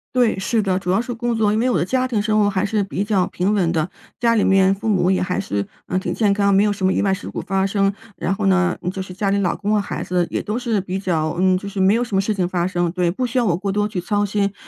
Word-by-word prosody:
对， 240 -6 +2
是 220 +3 +1
的， 190 -2 0
主 180 -1 -2
要 195 +4 +2
是 245 0 -5
工 240 0 -2
作。 215 -2 +2
因 215 - +1
为 250 - +2
我 245 - +2
的 - - +1
家 255 +7 0
庭 225 -5 0
生 215 0 +1
活 205 -1 +3
还 195 0 0
是 210 0 0
比 195 +1 -2
较 205 -4 +1
平 190 +4 -1
稳 185 -5 +2
的， 160 +1 0 0.3
家 235 -1 +2
里 220 - +2
面 190 0 +4
父 205 +3 -5
母 190 -3 +2
也 190 - +1
还 180 0 -1
是， 100 - -3 0.2
呃， 185 - 0
挺 - - -3
健 210 -3 +2
康， 200 -1 +2
没 195 - +5
有 210 - +2
什 200 -2 -2
么 190 - +3
意 - - +1
外 195 -1 +2
事 195 - -5
故 - - -5
发 195 0 0
生。 195 0 +1 0.2
然 195 - -1
后 200 +1 -2
呢， 185 -2 +2 0.2
就 190 - -4
是 185 -1 -8
家 195 +2 -1
里 200 - +2
老 185 -3 +1
公 205 +1 -1
和 210 - +3
孩 - - -5
子 180 -1 0
也 - - -1
都 210 +2 -3
是 235 -4 0
比 190 0 -4
较 160 -5 -1
嗯， 185 0 +3
就 200 - -7
是 200 -1 -3
没 195 +3 +4
有 235 - +1
什 225 -5 -2
么 195 - +3
事 215 +2 -1
情 185 -3 0
发 175 -1 -1
生， 175 -2 0
对， 180 -2 +1
不 250 +7 -2
需 255 +2 -3
要 245 - +3
我 175 -5 +1
过 195 +1 -2
多 205 +1 0
去 185 - -3
操 205 +3 0
心、 200 -1 -1
195 Hz, 340 characters per minute, -20 LUFS, 185-210 Hz, 0.3 s, 没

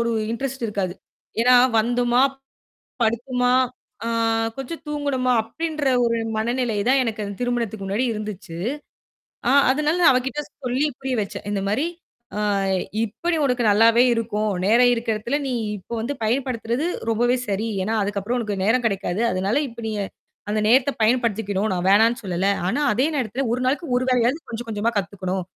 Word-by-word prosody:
ஒரு 235 0 +1 0.2
இன்டெரெஸ்ட் 265 0 -3
இருக்காது. 195 -4 -2 0.5
ஏன்னா, 250 +1 +5 0.2
வந்துமா! 240 +2 +2 0.8
படுத்துமா! 245 +2 +1 0.5
அ - - -2 0.5
கொஞ்சம் 270 +5 -6
தூங்கனுமா! 285 -4 0
அப்படின்ற 310 +5 -4 0.2
ஒரு 230 0 +1 0.2
மனநிலை 235 0 0
தான் 265 0 +4
எனக்குத் 210 -4 -4
திருமணத்துக்கு 235 -5 -2
முன்னாடி 205 +6 0
இருந்துச்சு. 210 -5 -6 0.9
அ - - +4 0.2
அதனால 300 +5 +1
அவகிட்ட 260 +3 -1 0.2
சொல்லிப் 255 +2 0
புரிய 265 -1 -2
வச்சேன். 200 - -7
இந்த 200 -1 -1
மாதிரி, 265 +11 +1 0.5
அ - - -2 0.7
இப்ப 220 +8 -10
நீ - - 0
உனக்கு 250 -2 0
நல்லாவே 230 +3 +5
இருக்கும். 215 -2 -1 0.2
நேரம் 240 +4 +5
இருக்குறதுல 230 +3 -1
நீ 255 - -1 0.2
இப்போ 195 +5 -8
வந்து 280 +5 -3
பயன்படுத்துறது 245 +3 -1 0.2
ரொம்பவே 240 +3 +2
சரி. 205 +3 -1 0.2
ஏன்னா, 220 +3 0
அதுக்கப்புறம் 205 +4 -2
உனக்கு 205 -4 -3
நேரம் 240 +4 +2
கிடைக்காது. 195 -1 -1
அதனால 190 +6 0
இப்ப 235 -1 -15
நீ, - - -2 0.6
அந்த 215 +1 +1
நேரத்தை 260 +4 +4
பயன்படுத்திக்கணும். 220 -3 +1
நா - - -1
வேணாம்னு 225 +5 +4
சொல்லல. 185 0 -1 0.2
ஆனா 275 - 0
அதே 250 +6 +2
நேரத்துல, 250 0 -1
ஒரு 250 - -3
நாளைக்கு 280 +6 0
ஒரு 250 - +1
வேலையாது 250 +2 +3
கொஞ்சம் 235 +1 -5
கொஞ்சமா 220 +1 0
கத்துக்கணும், 190 -1 -3
235 Hz, 150 wpm, -23 LUFS, 210-255 Hz, 0.9 s, ஏன்னா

